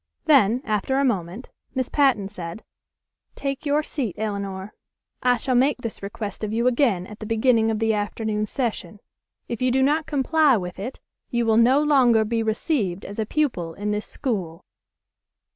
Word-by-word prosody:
Then 255 Hz, -5 st, +4 dB
after 215 Hz, +5 st, 0 dB
a 275 Hz, -, +3 dB
moment 200 Hz, 0 st, -2 dB, 0.2 s
Miss 260 Hz, -1 st, 0 dB
Patten 265 Hz, -9 st, +2 dB
said, 180 Hz, 0 st, -8 dB, 0.7 s
"Take 275 Hz, +2 st, -4 dB
your 295 Hz, +2 st, +2 dB
seat, 255 Hz, -, -3 dB
Elinor. 200 Hz, -2 st, -4 dB, 0.5 s
I 250 Hz, -1 st, +3 dB
shall 255 Hz, +3 st, -1 dB
make 260 Hz, +4 st, +3 dB
this 230 Hz, -3 st, -6 dB
request 200 Hz, +1 st, -6 dB
of 210 Hz, -, -2 dB
you 230 Hz, +2 st, 0 dB
again 235 Hz, -8 st, +2 dB
at 210 Hz, +2 st, -11 dB
the 215 Hz, -, -7 dB
beginning 225 Hz, 0 st, +3 dB
of 220 Hz, -, 0 dB
the 225 Hz, 0 st, +1 dB
afternoon 210 Hz, 0 st, -2 dB
session. 225 Hz, -3 st, -3 dB, 0.5 s
If 235 Hz, -1 st, -5 dB
you 255 Hz, -, +3 dB
do 265 Hz, +1 st, +2 dB
not 300 Hz, +3 st, +1 dB
comply 290 Hz, -1 st, +3 dB
with 180 Hz, -1 st, -6 dB
it 240 Hz, +7 st, -6 dB, 0.3 s
you 235 Hz, -1 st, 0 dB
will 220 Hz, -1 st, +3 dB
no 255 Hz, +5 st, +5 dB
longer 250 Hz, -7 st, +4 dB
be 230 Hz, +1 st, 0 dB
received 220 Hz, -, -1 dB
as 205 Hz, +2 st, -7 dB
a 215 Hz, -, -1 dB
pupil 200 Hz, -, -1 dB
in 210 Hz, +1 st, -3 dB
this 210 Hz, 0 st, -2 dB
school." 190 Hz, -, -4 dB
225 Hz, 175 wpm, -23 LUFS, 205-265 Hz, 0.7 s, no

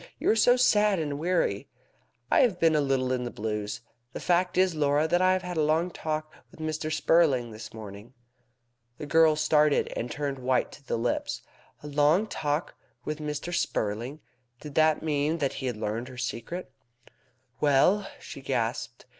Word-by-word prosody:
"You -, -, 0 dB
look 220 Hz, -, +3 dB
so 245 Hz, +3 st, +6 dB
sad 210 Hz, -5 st, +4 dB
and 145 Hz, -3 st, -3 dB
weary!" 165 Hz, -, 0 dB, 0.6 s
"I -, -, +5 dB
have 200 Hz, -8 st, +3 dB
been 165 Hz, -2 st, +4 dB
a 150 Hz, -, +3 dB
little 135 Hz, -2 st, 0 dB
in 125 Hz, -1 st, 0 dB
the 120 Hz, -, -3 dB
blues. 105 Hz, -1 st, -4 dB, 0.3 s
The -, -, -5 dB
fact 180 Hz, +1 st, +1 dB
is, 185 Hz, -1 st, +4 dB
Laura, 150 Hz, 0 st, +2 dB
that 175 Hz, +2 st, +2 dB
I 185 Hz, 0 st, +4 dB
have 185 Hz, 0 st, -1 dB
had 180 Hz, -1 st, -5 dB
a -, -, +3 dB
long 160 Hz, +4 st, +1 dB
talk 155 Hz, -1 st, -4 dB, 0.2 s
with -, -, -18 dB
Mr. 155 Hz, 0 st, -3 dB
Spurling 145 Hz, -8 st, +3 dB
this 110 Hz, +1 st, -9 dB
morning." 110 Hz, +2 st, -10 dB, 0.8 s
The -, -, -6 dB
girl 160 Hz, +1 st, +5 dB
started, 150 Hz, -1 st, +2 dB
and 120 Hz, -, -3 dB
turned 140 Hz, -1 st, -3 dB
white 125 Hz, -1 st, 0 dB
to 145 Hz, -, -14 dB
the 130 Hz, -, -2 dB
lips. 115 Hz, +1 st, -2 dB, 0.4 s
A -, -, -7 dB
long 150 Hz, +7 st, +3 dB
talk 150 Hz, -5 st, -2 dB, 0.3 s
with 155 Hz, 0 st, -3 dB
Mr. 150 Hz, +3 st, -4 dB
Spurling! 120 Hz, -3 st, -2 dB, 0.4 s
Did 150 Hz, -2 st, -9 dB
that 155 Hz, 0 st, +3 dB
mean 150 Hz, +1 st, 0 dB
that 140 Hz, -4 st, -1 dB
he 130 Hz, -, -2 dB
had 120 Hz, -3 st, -3 dB
learned 110 Hz, +3 st, -3 dB
her 130 Hz, -1 st, -11 dB
secret? 125 Hz, +7 st, -5 dB, 0.9 s
"Well?" 150 Hz, +8 st, +3 dB
she -, -, -9 dB
gasped. -, -, -3 dB
150 Hz, 180 wpm, -27 LUFS, 130-165 Hz, 0.9 s, so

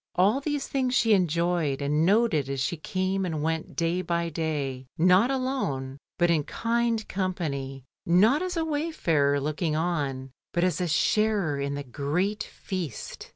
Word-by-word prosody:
All 205 Hz, +9 st, +3 dB
these 290 Hz, -1 st, -2 dB
things 255 Hz, -2 st, 0 dB
she 225 Hz, -3 st, +4 dB
enjoyed 170 Hz, -5 st, +1 dB
and 150 Hz, +2 st, +1 dB
noted 200 Hz, -, +3 dB
as 135 Hz, -1 st, -2 dB
she 140 Hz, +6 st, 0 dB
came 185 Hz, +3 st, -1 dB
and 160 Hz, -5 st, -2 dB
went 160 Hz, 0 st, -2 dB
day 170 Hz, +2 st, 0 dB
by 170 Hz, -1 st, -1 dB
day, 145 Hz, -5 st, -3 dB
not 185 Hz, +7 st, +5 dB
alone, 255 Hz, -, -2 dB, 0.2 s
but 175 Hz, -1 st, +3 dB
in 155 Hz, -3 st, +2 dB
kind 230 Hz, +3 st, -1 dB
company, 145 Hz, -9 st, -3 dB, 0.2 s
not 210 Hz, -, +4 dB
as 365 Hz, -1 st, -2 dB
a 325 Hz, -, 0 dB
wayfarer 175 Hz, -, +1 dB
looking 155 Hz, +2 st, -1 dB
on, 145 Hz, -6 st, -2 dB, 0.2 s
but 175 Hz, -, +1 dB
as 180 Hz, 0 st, +1 dB
a 180 Hz, -, 0 dB
sharer 195 Hz, -2 st, +1 dB
in 140 Hz, 0 st, -2 dB
the 145 Hz, -, -4 dB
great 155 Hz, -, -1 dB
feast. 175 Hz, -, -6 dB
170 Hz, 155 wpm, -27 LUFS, 145-210 Hz, 0.2 s, not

